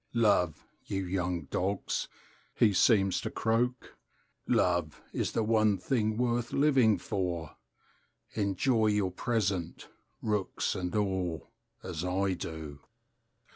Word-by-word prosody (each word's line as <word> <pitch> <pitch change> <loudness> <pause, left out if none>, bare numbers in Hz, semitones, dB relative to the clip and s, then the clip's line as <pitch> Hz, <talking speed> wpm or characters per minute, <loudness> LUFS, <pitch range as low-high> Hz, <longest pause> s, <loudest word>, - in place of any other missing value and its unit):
"Love, 100 -8 +2 0.2
you 95 -1 -2
young 90 -2 -1
dogs," 95 +2 -1 0.5
he 105 -3 +4
seems 95 -1 +4
to - - -3
croak, 120 +3 -1 0.5
"Love 85 -4 +1
is - - -1
the 115 - +1
one 110 -2 +3
thing 110 +1 0
worth 120 -1 0
living 135 -7 +4
for! 90 -6 -3 0.8
Enjoy 110 +3 +1
your 105 -3 +1
present, 95 -4 -2 0.3
rooks 105 -3 -1
and 90 +2 -3
all, 95 -6 -1 0.3
as 85 -3 -4
I 95 +1 0
do!" 80 -4 -6
100 Hz, 110 wpm, -30 LUFS, 90-110 Hz, 0.8 s, he